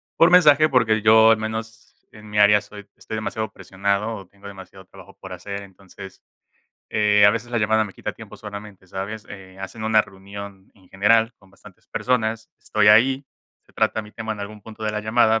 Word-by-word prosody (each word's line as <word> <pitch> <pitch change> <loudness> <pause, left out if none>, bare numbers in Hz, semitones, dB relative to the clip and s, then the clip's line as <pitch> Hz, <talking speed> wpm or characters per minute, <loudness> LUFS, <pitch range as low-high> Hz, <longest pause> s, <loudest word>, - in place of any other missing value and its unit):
por 170 +2 +5
mensaje, 155 -3 +6
porque 110 -4 +2
yo 110 0 +7
al 110 - +4
menos 110 +1 -7
en 105 -1 -14
mi 105 0 -1
área 105 0 +6
soy 105 -1 -13
estoy 110 - -8
demasiado 110 0 -4
presionado 100 +3 -2
o 95 -3 -10
tengo 100 +1 -15
demasiado 95 -1 -12
trabajo 95 +1 -16
por 95 -1 -9
hacer, 100 +3 -7
entonces, 95 0 -13 0.7
eh, 105 -1 +3
a 100 - +8
veces 115 +2 -5
la 120 - +1
llamada 110 +1 +2
me 100 - -9
quita - - -6
tiempo - - -12
solamente, 105 -2 -10
¿sabes? 105 +3 -6
Eh, 95 -1 -12
hacen 110 +3 -7
una 110 -1 +4
reunión 100 0 -11
en 95 -2 -24
general 110 +4 +2
con 95 -1 -23
bastantes 100 - -18
personas, 110 -3 -2
estoy 105 -1 +2
ahí, 130 +6 +5 0.4
se - - -26
trata 110 - 0
mi 105 0 -13
tema 110 -1 -6
en 105 - -4
algún 100 0 -8
punto 110 0 -10
de 105 - -1
la 105 - -2
llamada, 110 0 +2
105 Hz, 200 wpm, -22 LUFS, 100-110 Hz, 0.7 s, a